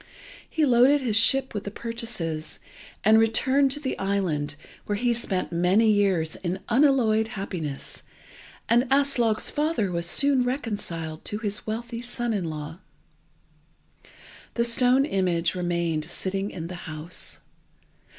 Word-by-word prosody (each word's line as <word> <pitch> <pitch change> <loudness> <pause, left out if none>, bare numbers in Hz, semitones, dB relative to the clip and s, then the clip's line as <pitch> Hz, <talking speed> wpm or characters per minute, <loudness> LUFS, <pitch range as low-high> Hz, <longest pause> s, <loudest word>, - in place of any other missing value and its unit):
He 315 -2 +1
loaded 260 +3 +5
his 235 -5 0
ship 265 +4 +5
with 205 -2 -5
his 200 - -7
purchases, 185 -10 -3 0.4
and 220 +1 +6
returned 260 +5 +3
to 280 +3 0
the 270 -3 -3
island, 175 -7 -1 0.3
where 205 - 0
he 240 +3 +1
spent 200 -7 -2
many 180 +6 +3
years 190 -6 +1
in 180 0 -3
unalloyed 235 -4 +3
happiness, 180 - -6 0.7
and 240 +2 +3
Aslog's 270 -6 +2
father 295 - 0
was 170 0 -1
soon 275 +5 +3
reconciled 205 - -4
to 210 - -2
his 210 -1 -4
wealthy 230 +2 -4
son 240 -1 -2
in 195 -4 -2
law. 155 +2 -7 1.8
The 235 - +2
stone 250 +3 +4
image 180 - 0
remained 170 -3 -2
sitting 195 +1 -3
in 165 -5 -7
the 175 -1 -8
house. 155 +3 -4
215 Hz, 130 wpm, -25 LUFS, 175-245 Hz, 1.8 s, and